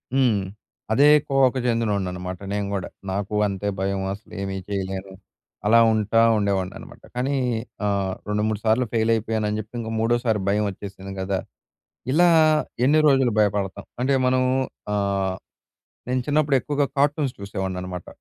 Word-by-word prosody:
హ్మ్. 125 -6 +3 0.5
అదే 135 +6 +5 0.2
కోవకు 135 -1 +3
చెందినోడినన్నమాట 95 -6 -1
నేను 105 0 -1
కూడా. 95 -2 -2 0.2
నాకు 100 +2 -3
అంతే 100 0 -3
భయం, 95 0 -1
అసలేమీ 100 -1 -6
జేయలేను. 95 -1 -4 0.5
అలా 115 +2 +6
ఉంటా 110 +1 +2 0.2
ఉండేవాడినన్నమాట. 100 -3 -3
కానీ 130 +3 0 0.5
ఆహ్, 100 -2 0
రెండు 105 0 0
మూడు 110 -2 -1
సార్లు 115 +3 +3
ఫెయిల్ 115 0 +2
అయిపోయానని 110 -1 -1
జెప్పి 110 +3 -8
ఇంక 110 -1 -4
మూడోసారి 115 -1 +1
భయమొచ్చేసింది 100 -1 -2
గదా! 95 0 -1 0.7
ఇలా 175 +4 +5 0.6
ఎన్ని 150 +4 +5
రోజులు 135 -4 +4
భయపడతాం! 100 -1 0 0.2
అంటే 135 +2 +2
మనము 130 0 +2 0.5
ఆహ్, 100 -2 0 0.7
నేను 130 0 +1
చిన్నప్పుడు 150 -1 +2
ఎక్కువగా 145 0 0
కార్టూన్స్ 145 -1 +1
జూసేవాడినన్నమాట. 95 -3 -5
105 Hz, 125 wpm, -23 LUFS, 100-125 Hz, 0.7 s, అలా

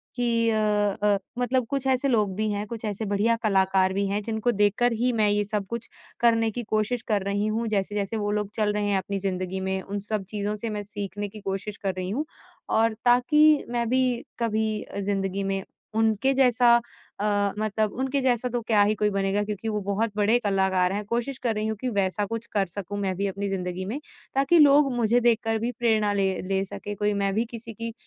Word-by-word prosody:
कि 230 -2 +2
अ 220 - +1
अ, 210 -1 +2 0.2
मतलब 250 0 +1
कुछ 275 -1 -2
ऐसे 260 +1 +2
लोग 210 -7 +1
भी 215 0 -1
हैं, 205 0 -2
कुछ 230 0 -7
ऐसे 210 +1 -3
बढ़िया 205 +3 +2
कलाकार 190 -2 +3
भी 200 +1 0
हैं 200 +2 -1
जिनको 225 +2 0
देखकर 210 +3 +3
ही 245 +3 +1
मैं 215 -2 +3
ये 205 0 +2
सब 205 -1 -2
कुछ 235 -1 -5 0.3
करने 230 -1 +3
की 240 +3 -4
कोशिश 215 +3 0
कर 210 -3 +1
रही 200 +1 -1
हूँ। 225 +2 -1
जैसे-जैसे 205 +1 -1
वो 205 0 -1
लोग 210 -1 -1
चल 210 -2 +1
रहे 210 0 -1
हैं 200 -1 +2
अपनी 195 +1 -3
ज़िंदगी 185 -1 -2
में, 190 0 -1
उन 200 +1 -5
सब 210 0 -3
चीज़ों 210 0 -2
से 225 +2 -4
मैं 210 -1 -4
सीखने 205 0 -5
की 215 - -10
कोशिश 195 +2 -4
कर 195 -2 -2
रही 185 0 -3
हूँ। 270 +10 -2 0.4
और 225 0 +2
ताकि 300 +5 +5
मैं 235 -1 -1
भी 260 +1 +3 0.4
कभी 220 -2 0
अ, 200 - -7
ज़िंदगी 195 -1 -1
में 195 0 -2 0.3
उनके 225 +4 +2
जैसा 245 -2 +5 0.5
अ, 205 -1 +1
मतलब 215 0 0
उनके 265 +1 0
जैसा 250 -1 +1
तो 240 0 -2
क्या 220 -2 +3
ही 210 +1 +2
कोई 210 0 +1
बनेगा 195 +1 +1
क्योंकि 210 +1 -5
वो 210 -1 -2
बहुत 200 +3 -1
बड़े 215 +3 +4
कलाकार 190 -3 +1
हैं। 205 0 -3
कोशिश 240 +4 -2
कर 225 -3 +1
रही 215 +1 -1
हूँ 220 - -2
कि 255 - -1
वैसा 200 -1 0
कुछ 230 +3 -5
कर 200 -2 +2
सकूँ 200 +2 -6
मैं 190 -2 -1
भी 200 - 0
अपनी 200 +1 -3
ज़िंदगी 185 -1 -3
में 240 +9 -4 0.4
ताकि 275 +5 +4
लोग 285 -2 +6
मुझे 235 0 +3
देखकर 225 -1 +2
भी 235 +2 -1
प्रेरणा 215 -3 +2
ले 195 -1 +2 0.2
ले 195 0 +1
सके 205 +1 -7
कोई 205 +1 0
मैं 200 -1 0
भी 225 - +1
किसी 230 -1 -8
की 230 +1 -5
210 Hz, 215 wpm, -25 LUFS, 200-230 Hz, 0.5 s, लोग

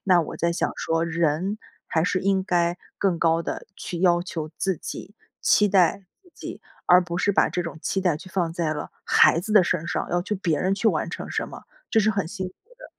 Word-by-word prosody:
那 180 -3 +5
我 - - -7
在 170 - +1
想 170 - -1
说 165 0 0
人 170 +5 0 0.3
还 160 - +1
是 185 +2 +1
应 195 0 +1
该 175 -1 +1 0.2
更 190 -4 +1
高 165 0 +2
地 - - -5
去 175 - -5
要 175 -2 +4
求 160 -4 -5
自 190 -2 0
己， 200 - -8 0.3
期 210 - +4
待 190 0 +3 0.2
自 360 - -23
己， - - -8 0.2
而 180 +1 +7
不 170 -1 -4
是 180 - +2
把 - - +3
这 180 - -2
种 165 -1 -7
期 195 - -1
待 180 -5 +1
去 185 - -12
放 175 -3 -1
在 165 -2 -1
了 - - -6
孩 - - +5
子 210 +5 -4
的 210 -3 +7
身 165 -1 -1
上， - - -2
要 175 0 +1
去 210 +4 -3
别 170 -6 0
人 190 +1 +1
去 215 +3 -1
完 - - 0
成 - - -6
什 - - -2
么， - - -10 0.3
这 225 - +3
是 215 +1 +3
很 200 -5 -1
辛 190 0 -4
苦 185 - -19 0.2
的。 - - -13
180 Hz, 250 characters per minute, -24 LUFS, 165-195 Hz, 0.3 s, 而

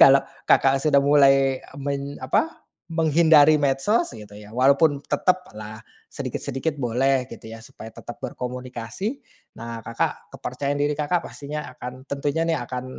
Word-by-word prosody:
kalau 135 0 +8 0.3
Kakak 135 0 +4
sudah 140 -1 +4
mulai 135 -2 +4 0.2
meny 140 0 -4
apa, 325 - 0 0.2
menghindari 160 -2 +5
medsos, 140 - +1
gitu 105 -2 -11
ya, 105 +1 -13
walaupun 140 +3 +4
tetaplah 110 -12 -1 0.2
sedikit-sedikit 145 +3 -4
boleh, 130 +2 +1
gitu 110 -1 -10
ya, 115 - -8
supaya 110 0 -11
tetap 120 - -10
berkomunikasi. 125 - -5 0.4
Nah, 115 0 -6
Kakak 115 0 -3
kepercayaan 140 +3 -3
diri 145 +1 +1
Kakak 155 +4 -1
pastinya 150 +1 -6
akan 125 +2 -9
tentunya 145 +4 -1
nih 165 - +2
akan 125 +1 -5
140 Hz, 135 wpm, -24 LUFS, 125-150 Hz, 0.4 s, kalau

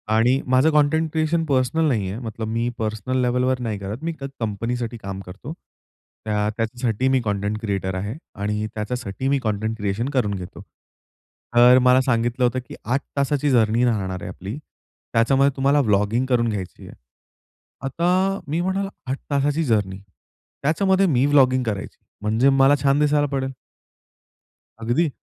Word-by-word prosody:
आणि 125 +4 +3
माझं 130 +5 +4
content 150 +1 +2
creation 160 +1 0
personal 140 +3 +1
नाहीये. 105 -6 -1
मतलब 110 -2 -5
मी 115 +2 -1
पर्सनल 110 +4 -1
लेव्हलवर 125 +1 +1
नाही 110 -4 -3
करत, 105 +9 -6
मी 165 0 -2
कंपनीसाठी 120 -2 -3
काम 95 -2 -6
करतो. 105 - -8 0.7
त्या 105 0 0
त्याच्यासाठी 120 +1 -1
मी 130 -1 +3
कंटेंट 105 +1 -1
क्रिएटर 95 -3 -2
आहे 100 +6 -4 0.3
आणि 105 +1 -1
त्याच्यासाठी 120 +2 -4
मी 140 0 +3
कंटेंट 110 +1 -2
क्रिएशन 105 +5 -2
करून 105 -6 +1
घेतो. 90 -1 -8 0.9
तर 125 +2 +7
मला 130 +1 +5
सांगितलं 120 0 0
होतं, 130 +1 0
की - - -9
"8 130 +5 0 0.2
तासांची 140 +1 +1
जर्नी 115 0 +3
राहणार 95 -6 -1
आहे - - -6
आपली. 100 +8 -7 0.6
त्याच्यामध्ये 135 +4 +3
तुम्हाला 140 +2 +3
व्लॉगिंग 105 +5 +2
करून 120 -3 +1
घ्यायची 95 -4 -6
आहे." - - -11 0.9
आता 185 +6 +1
मी 160 +4 -1
म्हणालो, 195 +2 -1 0.2
"8 135 - -1
तासांची 145 +3 +1
जर्नी, 105 -7 0 0.7
त्याच्यामध्ये 190 +5 +3
मी 135 -3 +2
व्लॉगिंग 130 -3 +4
करायची, 105 -5 -4 0.2
म्हणजे 110 +6 +3
मला 135 +1 +5
छान 140 +1 +3
दिसायला 150 0 +3
पडेल." 135 -1 -2 1.3
अगदी. 120 +8 +1
125 Hz, 145 wpm, -22 LUFS, 110-140 Hz, 1.3 s, तर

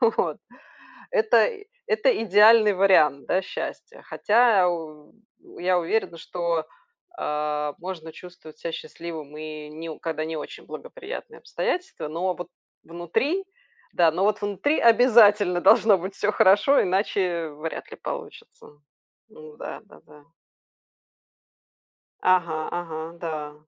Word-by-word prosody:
Вот. 230 -2 +1 0.7
Это 455 -2 +4
и 415 -4 -10 0.2
это 475 +2 +2
идеальный 210 +1 +6
вариант, 155 -8 +3
да, 185 - +1
счастья, 465 - -7
хотя 215 -4 +3
у 155 -2 -8 0.4
я 180 0 +2
уверена, 170 0 -2
что, 170 -1 -3 0.5
а, 150 - -2
можно 170 -3 -7
чувствовать 160 -2 -14
ся 170 - -5
счастливым 160 -3 -8
и 155 -1 -8
не 160 +2 -8
у 155 - -9
когда 155 -1 -3
не 160 0 -4
очень 150 - -8
благоприятные - - -9
обстоятельства, 365 - -4
но 180 +4 -2
вот 175 - -8 0.4
внутри 175 - -2 0.5
да, 170 -2 +4
но 185 +4 0
вот 210 0 +1
внутри 205 - 0
обязательно 215 -6 +5
должно 210 +1 +5
быть 190 +3 -6
всё 205 - 0
хорошо, 205 +9 +4
иначе 185 -3 -1
вряд 155 +2 -7
ли - - -9
получится. - - -9 0.6
Ну 155 -7 -14
да, - - -7
да, - - -18
да. 150 -1 -18 2.0
Ага 170 -4 +2 0.2
ага. 165 -3 -6 0.2
Да. 155 -3 -5
180 Hz, 125 wpm, -24 LUFS, 160-210 Hz, 2.0 s, идеальный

